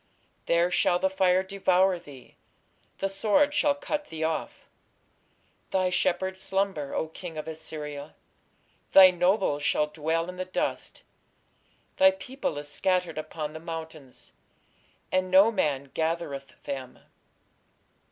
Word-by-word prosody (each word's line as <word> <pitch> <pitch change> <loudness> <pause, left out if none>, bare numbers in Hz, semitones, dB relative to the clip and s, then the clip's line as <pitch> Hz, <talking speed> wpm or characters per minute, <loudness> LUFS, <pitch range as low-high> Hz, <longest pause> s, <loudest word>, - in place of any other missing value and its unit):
There 170 +1 +3
shall 175 - +3
the 190 +1 0
fire 185 -1 +3
devour 190 -1 +2
thee; 140 -7 -14 0.6
the 195 - -1
sword 215 +9 +2
shall 290 -1 +3
cut 295 +1 -3
thee 160 0 -6
off.... 160 0 -3 1.0
Thy 185 -1 +1
shepherds 190 +1 0
slumber, 190 -7 -1
O 160 - -1
king 165 0 -9
of 155 - -5
Assyria: 150 -2 -7 0.8
thy 190 -1 +10
nobles 180 -4 +1
shall 150 +1 +2
dwell 160 +2 -2
in 180 0 -8
the 185 - -2
dust: 185 - -3 0.9
thy 285 0 +7
people 270 - -4
is 145 0 -5
scattered 180 +2 0
upon 155 -1 -5
the 160 - -7
mountains, 160 -5 -9 0.8
and 185 0 +1
no 195 +4 +6
man 140 -9 -1
gathereth 160 -4 -3
them. 135 -3 -6
175 Hz, 125 wpm, -27 LUFS, 155-190 Hz, 1.0 s, thy